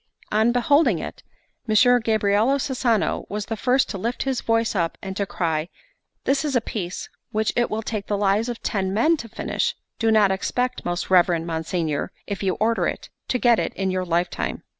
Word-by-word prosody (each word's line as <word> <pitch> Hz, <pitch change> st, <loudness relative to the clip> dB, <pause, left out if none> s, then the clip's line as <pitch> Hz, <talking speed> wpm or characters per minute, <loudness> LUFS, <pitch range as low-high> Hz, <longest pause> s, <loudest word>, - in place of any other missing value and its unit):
On 220 Hz, +3 st, +3 dB
beholding 245 Hz, -, +3 dB
it, -, -, -7 dB, 0.5 s
Messer 245 Hz, +3 st, +5 dB
Gabriel 215 Hz, -1 st, +2 dB
Cesano 250 Hz, -5 st, 0 dB
was 210 Hz, 0 st, -3 dB
the 225 Hz, -, -3 dB
first 255 Hz, +4 st, +2 dB
to 200 Hz, -, -4 dB
lift 235 Hz, +5 st, -2 dB
his 265 Hz, -2 st, -1 dB
voice 225 Hz, 0 st, +1 dB
up, 170 Hz, -5 st, -1 dB
and 190 Hz, 0 st, -6 dB
to 200 Hz, 0 st, -1 dB
cry: 165 Hz, -2 st, -1 dB, 0.5 s
"This 275 Hz, +1 st, +1 dB
is 290 Hz, -3 st, -1 dB
a -, -, +5 dB
piece 185 Hz, -6 st, -5 dB, 0.2 s
which 215 Hz, -1 st, 0 dB
it 240 Hz, -, +2 dB
will 220 Hz, +1 st, -2 dB
take 215 Hz, -2 st, -4 dB
the 205 Hz, -, 0 dB
lives 205 Hz, +3 st, +1 dB
of 240 Hz, -, -6 dB
ten 190 Hz, -2 st, -1 dB
men 310 Hz, +10 st, +4 dB
to 230 Hz, -5 st, -8 dB
finish: -, -, -2 dB, 0.2 s
do 225 Hz, -, +2 dB
not 215 Hz, -3 st, +5 dB
expect, 250 Hz, +6 st, -1 dB
most 175 Hz, +1 st, -2 dB
reverend 175 Hz, -2 st, +4 dB
monsignor, 160 Hz, -2 st, -2 dB
if 200 Hz, -, -4 dB
you 190 Hz, -2 st, 0 dB
order 230 Hz, +1 st, +1 dB
it, -, -, -5 dB, 0.2 s
to 250 Hz, -, +1 dB
get 240 Hz, -2 st, +4 dB
it -, -, -2 dB
in 190 Hz, -1 st, -1 dB
your 185 Hz, 0 st, -1 dB
lifetime. 175 Hz, 0 st, -1 dB
215 Hz, 195 wpm, -23 LUFS, 190-240 Hz, 0.5 s, Messer